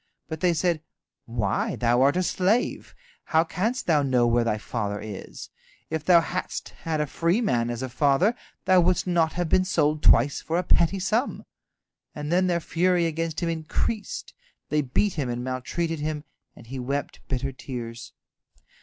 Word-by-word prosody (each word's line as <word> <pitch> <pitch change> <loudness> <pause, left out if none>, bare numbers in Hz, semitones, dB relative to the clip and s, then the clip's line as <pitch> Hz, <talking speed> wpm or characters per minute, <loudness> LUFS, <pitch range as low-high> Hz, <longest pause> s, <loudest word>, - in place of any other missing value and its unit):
But 160 -1 -5
they 175 0 +2
said, 170 -1 +1 0.5
"Why, 115 -4 -1
thou 120 +1 +2
art 140 +5 +4
a 185 - +2
slave! 195 +7 0 0.3
How 160 0 +3
canst 220 +9 -2
thou 155 -4 +3
know 130 -3 +2
where 120 0 +3
thy 115 -2 0
father 105 -1 -3
is? 105 -2 -8 0.4
If 160 -2 -2
thou 170 -1 +6
hadst 180 +2 -4
had 160 -2 -4
a 150 - +1
free 170 - +1
man 120 - +1
as 120 +1 -3
father, 145 - +3 0.3
thou 185 -1 +6
wouldst 180 +1 +2
not 170 -3 +2
have 175 -1 -1
been 185 +3 +3
sold 155 -5 +1
twice 135 +2 +4
for 165 - -1
a 180 - +1
petty 170 +3 +3
sum." 210 +8 -1 0.7
And 150 +1 -4
then 185 +1 +3
their 175 -1 +1
fury 175 +1 +1
against 165 0 -2
him 170 - 0
increased, 165 +6 -3 0.4
they 150 +1 +2
beat 160 +9 +1
him 140 -5 -2
and 120 0 -3
maltreated 150 +6 -2
him, 150 0 -3 0.3
and - - -14
he 130 +3 -6
wept 140 +3 -3
bitter 135 +1 -2
tears. 120 -3 -7
155 Hz, 170 wpm, -25 LUFS, 130-175 Hz, 0.7 s, thou